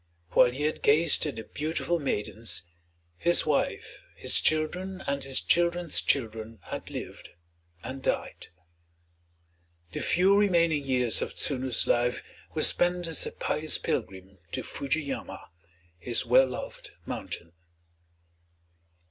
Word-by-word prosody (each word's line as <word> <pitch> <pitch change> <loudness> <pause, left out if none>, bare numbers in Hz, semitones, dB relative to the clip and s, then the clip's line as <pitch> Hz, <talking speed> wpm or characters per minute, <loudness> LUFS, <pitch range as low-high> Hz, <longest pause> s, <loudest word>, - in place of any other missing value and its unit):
While 120 - +6
he 130 +4 -5
had 155 +1 -1
gazed 155 +2 +4
at 145 - -4
the 110 - -6
beautiful 160 +6 -2
maidens, 110 - -2 0.6
his 175 0 +3
wife, 150 -2 -1
his - - +4
children, 180 +5 0
and 140 -1 -2
his 135 -1 +1
children's 175 -1 +3
children 115 -3 -1
had - - -7
lived - - -8 0.5
and 130 +1 -6
died. - - -3 1.4
The - - -4
few 190 +3 +3
remaining 170 -7 +3
years 125 -4 0
of - - -4
Tsunu's 130 -3 +1
life 120 0 +1 0.3
were 155 - +1
spent 175 0 +3
as 165 -3 +1
a - - -5
pious - - 0
pilgrim 95 0 -4
to - - -3
Fuji 145 +3 -2
yama, 140 - -7 0.5
his 120 +5 0
well 130 +3 +5
loved 125 - -7 0.2
mountain. 85 - -6
140 Hz, 125 wpm, -28 LUFS, 120-170 Hz, 1.4 s, While